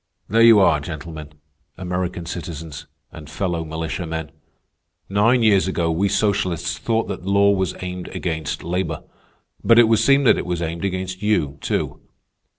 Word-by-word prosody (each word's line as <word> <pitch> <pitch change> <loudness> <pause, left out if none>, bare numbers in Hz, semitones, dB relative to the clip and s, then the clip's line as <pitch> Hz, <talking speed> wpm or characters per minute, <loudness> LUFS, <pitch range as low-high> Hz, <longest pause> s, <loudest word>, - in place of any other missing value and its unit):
"There 115 +4 +3
you 115 -2 +8
are 95 -6 +4
gentlemen, 75 0 -8 0.4
American 90 -1 -3
citizens, 80 -3 -7 0.2
and 80 -3 -11
fellow 85 -1 -2
militiamen. 80 0 -4 0.8
Nine 115 +5 +3
years 100 -4 +4
ago 85 -3 0
we 95 +5 +1
socialists 95 -5 0
thought 115 -1 0
that 90 - -6
law 100 +1 +4
was 95 -2 -1
aimed 90 0 -5
against 80 -5 -4
labor. 90 +3 -3 0.6
But 115 - +5
it 120 -1 +7
would 110 -1 +3
seem 140 +4 +4
that 125 - +4
it - - -4
was 90 -1 -2
aimed 85 +3 -3
against 95 0 -4
you, 80 -10 0
too. - - -2
90 Hz, 155 wpm, -21 LUFS, 80-100 Hz, 0.8 s, you